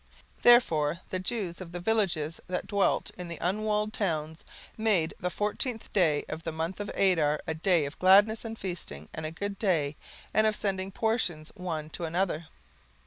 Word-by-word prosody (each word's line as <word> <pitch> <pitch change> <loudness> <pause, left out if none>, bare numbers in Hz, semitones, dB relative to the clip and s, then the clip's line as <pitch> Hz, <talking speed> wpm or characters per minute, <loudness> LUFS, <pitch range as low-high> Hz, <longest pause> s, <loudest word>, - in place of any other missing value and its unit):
17:009:019 - - -28
Therefore 170 -10 +5
the 185 - -1
Jews 185 -3 -2
of 175 -2 -8
the 175 - -4
villages, 175 -6 0
that 180 0 -2
dwelt 200 -2 +1
in 180 - -5
the 170 -1 -6
unwalled 210 +3 0
towns, 160 -5 -2 0.3
made 205 -8 +2
the 180 - -1
fourteenth 210 +4 -2
day 160 -7 +3
of 160 - -5
the 165 - -4
month 165 +4 -3
Adar 175 -7 +2
a 160 - -1
day 165 -1 +2
of 140 - -7
gladness 205 +4 +6
and 225 -1 -6
feasting, 155 - -6
and 155 0 -4
a - - -6
good 200 +4 -5
day, 155 -8 +1 0.4
and 215 0 +4
of 215 - +1
sending 190 -2 -2
portions 190 -8 -1
one 160 -5 -4
to 170 - -4
another. 170 -1 -1
180 Hz, 175 wpm, -29 LUFS, 160-205 Hz, 0.4 s, gladness